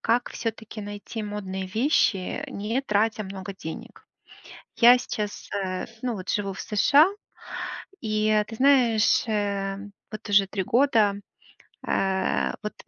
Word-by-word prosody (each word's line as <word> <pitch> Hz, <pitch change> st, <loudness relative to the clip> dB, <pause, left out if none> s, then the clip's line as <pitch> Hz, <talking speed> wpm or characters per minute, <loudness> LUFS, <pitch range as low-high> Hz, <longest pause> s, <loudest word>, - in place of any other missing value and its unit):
как 240 Hz, +2 st, +1 dB
всё-таки 220 Hz, -1 st, -5 dB
найти 205 Hz, +2 st, -6 dB
модные 195 Hz, -2 st, -4 dB
вещи, 215 Hz, -, +1 dB
не 220 Hz, +6 st, -2 dB
тратя 215 Hz, -3 st, +1 dB
много 190 Hz, 0 st, -7 dB
денег? 160 Hz, -, -8 dB, 0.7 s
Я 245 Hz, +1 st, +8 dB
сейчас, 210 Hz, -4 st, -5 dB
э, 185 Hz, -2 st, -2 dB, 0.2 s
ну 250 Hz, -2 st, -1 dB
вот, 185 Hz, -1 st, -7 dB
живу 200 Hz, -2 st, -1 dB
в 190 Hz, -, -10 dB
США, 280 Hz, -, +5 dB, 0.9 s
и, 215 Hz, -1 st, +2 dB
ты 225 Hz, -, -8 dB
знаешь, 245 Hz, -4 st, +4 dB
э, 200 Hz, -2 st, -1 dB, 0.3 s
вот 215 Hz, 0 st, -8 dB
уже 200 Hz, -1 st, +5 dB
3 195 Hz, 0 st, -2 dB
года, 225 Hz, -3 st, +3 dB, 0.7 s
э, 190 Hz, -1 st, 0 dB
вот, 210 Hz, -, -4 dB
210 Hz, 125 wpm, -25 LUFS, 195-225 Hz, 0.9 s, Я